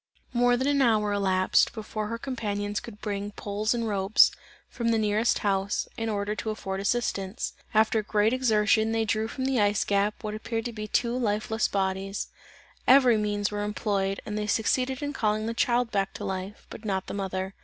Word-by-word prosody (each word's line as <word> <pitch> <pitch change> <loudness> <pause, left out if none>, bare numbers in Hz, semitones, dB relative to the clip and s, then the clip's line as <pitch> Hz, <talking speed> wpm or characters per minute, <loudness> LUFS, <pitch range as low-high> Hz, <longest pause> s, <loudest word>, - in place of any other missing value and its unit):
More 245 0 +3
than 260 - -1
an 285 0 +2
hour 215 -4 +3
elapsed, 190 -2 +2
before 215 -1 -4
her 230 +2 -3
companions 210 -5 -3
could 210 -3 -11
bring 205 -1 -3
poles 210 +3 -1
and 230 -1 -1
ropes, 200 0 +4 0.4
from 235 - -4
the 230 - +3
nearest 215 +2 +2
house, 195 0 0
in 225 0 -2
order 205 0 -1
to 220 - -3
afford 195 -3 -4
assistance. 200 -2 -1 0.2
After 220 0 +3
great 210 +2 +1
exertion 220 -3 +2
they 225 0 +1
drew 220 0 0
from 260 +3 -4
the 265 -4 +2
ice 205 0 +2
gap, 205 +2 0
what 210 -1 -3
appeared 225 +1 -3
to 240 - -4
be 215 -1 -5
two 235 +3 0
lifeless 220 -1 0
bodies; 195 0 -2 0.6
every 255 -3 +7
means 205 -1 0
were 205 0 -2
employed 200 -2 -1
and 210 0 -3
they 210 - -2
succeeded 255 +5 0
in 290 0 -2
calling 215 -3 0
the 230 - -2
child 240 0 +1
back 195 -1 -1
to - - -5
life, 190 +2 -5
but - - -9
not 190 -3 -1
the - - -6
mother. 190 -1 -3
215 Hz, 190 wpm, -27 LUFS, 200-230 Hz, 0.6 s, every